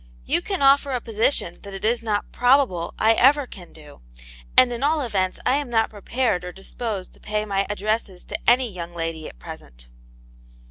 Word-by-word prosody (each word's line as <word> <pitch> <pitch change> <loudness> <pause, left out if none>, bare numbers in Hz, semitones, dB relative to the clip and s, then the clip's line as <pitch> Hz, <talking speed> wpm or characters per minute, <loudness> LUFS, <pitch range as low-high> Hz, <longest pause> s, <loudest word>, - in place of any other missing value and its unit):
You - - +1
can 385 -5 -2
offer 275 0 +5
a 250 - 0
position 225 -5 0
that 200 -1 -9
it 195 - -5
is* 235 +2 +1
not 210 -3 -2
probable 245 -9 +2
I 220 +1 +4
ever 275 +5 +4
can 180 -7 -11
do; 150 - -15 0.6
and 245 -1 +7
at 235 - -5
all 300 +2 +2
events 190 -7 -1
I 265 - +3
am 290 -3 -3
not 225 -2 +1
prepared 220 -2 -1
or 180 - -6
disposed 195 +1 -6
to - - -17
pay 210 0 -2
my 195 -1 -1
addresses 210 -2 -2
to - - -1
any 250 +1 +4
young 175 -4 -8
lady 165 -1 -4
at - - -16
present." - - -11
215 Hz, 190 wpm, -23 LUFS, 185-250 Hz, 0.6 s, and